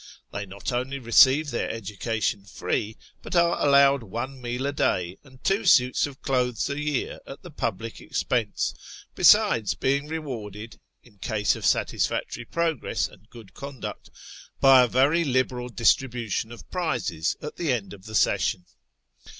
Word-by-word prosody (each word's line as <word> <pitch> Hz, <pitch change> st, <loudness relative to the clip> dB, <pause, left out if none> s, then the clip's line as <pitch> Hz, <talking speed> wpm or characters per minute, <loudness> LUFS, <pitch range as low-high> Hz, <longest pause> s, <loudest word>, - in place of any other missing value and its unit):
They 100 Hz, 0 st, -5 dB
not 100 Hz, +5 st, -5 dB
only 130 Hz, +3 st, -2 dB
receive 130 Hz, +4 st, +5 dB
their 120 Hz, -, -2 dB
education 105 Hz, -1 st, -3 dB
free, 105 Hz, +1 st, -3 dB, 0.2 s
but -, -, -6 dB
are 170 Hz, 0 st, +3 dB
allowed 140 Hz, -1 st, +5 dB
one 120 Hz, +5 st, -6 dB
meal 125 Hz, +2 st, -3 dB
a 140 Hz, -, 0 dB
day 90 Hz, -8 st, -1 dB
and 130 Hz, -2 st, -19 dB
two 195 Hz, +3 st, +1 dB
suits 125 Hz, 0 st, +4 dB
of 135 Hz, -2 st, -13 dB
clothes 125 Hz, -3 st, 0 dB
a 140 Hz, -, -3 dB
year 150 Hz, -3 st, -2 dB
at 135 Hz, -, -10 dB
the 175 Hz, -, -10 dB
public 115 Hz, -5 st, -4 dB
expense, -, -, -1 dB, 0.4 s
besides 100 Hz, -5 st, +4 dB
being 140 Hz, +6 st, 0 dB
rewarded, 115 Hz, -9 st, -6 dB, 0.2 s
in 105 Hz, -5 st, -22 dB
case 105 Hz, 0 st, 0 dB
of -, -, -2 dB
satisfactory 115 Hz, -, -1 dB
progress 165 Hz, -6 st, -1 dB
and 105 Hz, +1 st, -20 dB
good 110 Hz, -6 st, -14 dB
conduct, 140 Hz, -2 st, -8 dB, 0.5 s
by 135 Hz, -1 st, +7 dB
a 125 Hz, -, +4 dB
very 140 Hz, +8 st, +3 dB
liberal 130 Hz, -3 st, 0 dB
distribution 120 Hz, -2 st, 0 dB
of 115 Hz, -4 st, -12 dB
prizes 120 Hz, -, -1 dB
at 150 Hz, -, -8 dB
the 165 Hz, -5 st, 0 dB
end 115 Hz, -6 st, -2 dB
of 100 Hz, +1 st, -13 dB
the 110 Hz, -, -7 dB
session. 90 Hz, -3 st, +1 dB
125 Hz, 150 wpm, -25 LUFS, 110-140 Hz, 0.5 s, by